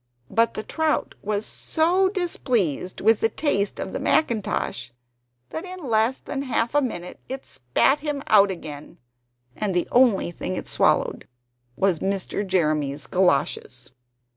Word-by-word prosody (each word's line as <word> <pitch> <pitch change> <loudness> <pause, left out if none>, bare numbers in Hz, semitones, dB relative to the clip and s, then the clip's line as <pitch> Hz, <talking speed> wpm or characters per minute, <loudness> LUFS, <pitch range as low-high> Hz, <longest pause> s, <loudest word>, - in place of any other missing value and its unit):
But 230 +1 +2
the 215 - -3
trout 315 +3 0
was 210 +1 -2
so 360 +4 +1
displeased 240 - -1
with 220 +1 +4
the 225 - +2
taste 205 -6 -1
of - - -4
the - - -2
mackintosh, 210 - 0 0.6
that 320 - -4
in 365 -5 -8
less 225 +3 +2
than 275 - -5
half 245 -3 -1
a 290 - +4
minute 180 -9 -5
it 265 +1 -5
spat 125 - +1
him 290 -2 -3
out 200 -2 +6
again; 155 -5 -7 0.6
and 200 -4 -2
the 175 - +1
only 240 -8 +4
thing 185 +2 -4
it - - -5
swallowed - - +1 0.5
was 185 0 +1
Mr. 195 +1 -2
Jeremy's 155 -6 0
galoshes. 145 -8 0
215 Hz, 140 wpm, -24 LUFS, 180-270 Hz, 0.6 s, out